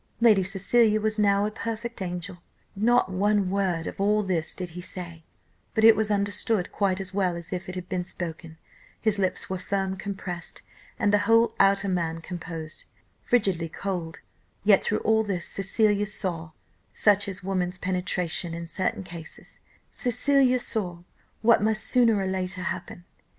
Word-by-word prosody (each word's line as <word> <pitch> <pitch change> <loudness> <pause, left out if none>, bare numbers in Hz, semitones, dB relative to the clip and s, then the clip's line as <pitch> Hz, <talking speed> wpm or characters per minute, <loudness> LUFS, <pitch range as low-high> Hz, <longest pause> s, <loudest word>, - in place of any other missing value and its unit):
Lady 220 -4 +5
Cecilia 210 +4 +3
was 215 0 -1
now 200 -1 +3
a 210 - -2
perfect 230 +1 -5
angel. 180 0 -5 0.4
Not 225 0 +3
one 200 0 +1
word 185 -4 0
of - - -5
all 210 +1 +3
this 175 -5 -1
did 180 -2 -6
he 180 +2 -7
say, 170 -2 -7 0.5
but 220 - +2
it 225 0 +9
was 215 0 0
understood 205 -1 0
quite 195 -2 0
as 190 -1 -5
well 185 -3 +1
as 170 +1 -6
if 180 0 -5
it 185 - -6
had 180 -1 -6
been 185 -1 -2
spoken: 165 -2 -6 0.4
his 215 -2 +1
lips 185 -2 -1
were 190 -1 -3
firm 190 0 -2
compressed, 190 -3 -6 0.3
and 205 - +1
the 205 - +5
whole 230 +1 +5
outer 195 +1 +4
man 170 -3 -1
composed 165 -2 -7 0.4
frigidly 190 -8 +1
cold; 175 -2 -4 0.5
yet 200 -1 +5
through 215 - 0
all 220 0 +3
this 195 -5 -3
Cecilia 205 +1 +1
saw 175 -6 -2 0.5
such 205 -1 +3
is 185 -2 -5
woman's 180 -1 -1
penetration 180 -2 -2
in 170 0 -6
certain 185 +3 -2
cases 170 -3 -9 0.3
Cecilia 255 +1 +4
saw 180 -8 -2 0.4
what 230 -1 +5
must 215 0 +1
sooner 235 -4 +4
or 195 - -1
later 185 -1 -3
happen. 175 -1 -5
195 Hz, 160 wpm, -26 LUFS, 180-210 Hz, 0.5 s, it